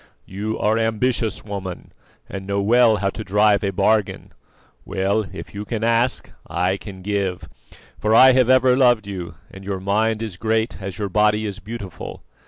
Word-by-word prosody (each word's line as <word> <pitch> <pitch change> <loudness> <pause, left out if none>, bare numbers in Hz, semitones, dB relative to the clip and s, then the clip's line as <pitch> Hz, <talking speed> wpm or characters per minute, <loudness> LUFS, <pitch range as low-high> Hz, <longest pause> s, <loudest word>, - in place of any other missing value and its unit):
"You 105 +3 -4
are 110 +2 +1
ambitious, 115 0 0
woman, 95 -4 -6 0.4
and 95 0 -7
know 100 0 -1
well 115 +2 +4
how 100 -1 -1
to 110 - -7
drive 105 +1 +3
a 100 - +1
bargain. 100 +2 0 0.5
Well, 100 +3 -1
if 95 - -9
you 100 +1 -5
can 110 +1 -4
ask, 115 +2 +1 0.2
I 90 +4 0
can 95 -2 -10
give, 100 -2 -2 0.5
for 110 +1 +2
I 130 +2 +8
have 130 -1 +3
ever 130 -1 +5
loved 120 -5 +3
you, 95 -4 -6 0.2
and 95 - -11
your 95 -1 -4
mind 110 +3 0
is 105 -5 -6
great 110 +1 -1
as 95 -1 -6
your 100 -2 -3
body 105 +2 +2
is 105 -1 -5
beautiful. 105 -4 -8
105 Hz, 175 wpm, -21 LUFS, 95-110 Hz, 0.5 s, I